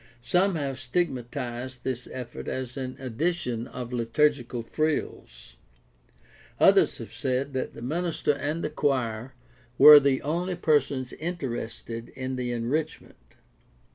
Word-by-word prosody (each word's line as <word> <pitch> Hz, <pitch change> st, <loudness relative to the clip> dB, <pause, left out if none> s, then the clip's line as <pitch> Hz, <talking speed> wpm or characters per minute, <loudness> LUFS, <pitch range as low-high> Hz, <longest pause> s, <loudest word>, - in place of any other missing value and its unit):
Some 180 Hz, +8 st, +2 dB
have 135 Hz, -4 st, -3 dB
stigmatized 125 Hz, -3 st, -3 dB
this 125 Hz, -2 st, -3 dB
effort 125 Hz, -2 st, -7 dB
as 130 Hz, -1 st, -4 dB
an 130 Hz, -2 st, -4 dB
addition 125 Hz, -2 st, -2 dB
of 125 Hz, -1 st, -7 dB
liturgical 120 Hz, 0 st, +1 dB
frills. 115 Hz, -, -3 dB, 1.0 s
Others -, -, +5 dB
have -, -, -9 dB
said 130 Hz, +2 st, -1 dB
that 130 Hz, -, -3 dB
the -, -, -8 dB
minister 160 Hz, +2 st, 0 dB
and 150 Hz, +3 st, -3 dB
the -, -, -2 dB
choir 125 Hz, -4 st, -1 dB, 0.4 s
were 150 Hz, -1 st, +11 dB
the 135 Hz, -2 st, +1 dB
only 175 Hz, +5 st, -1 dB
persons 140 Hz, -6 st, +1 dB
inter 170 Hz, -4 st, -4 dB
ested 115 Hz, 0 st, -6 dB
in 130 Hz, 0 st, -4 dB
the 125 Hz, -1 st, -2 dB
enrichment. 120 Hz, -, -4 dB
130 Hz, 125 wpm, -27 LUFS, 120-150 Hz, 1.0 s, were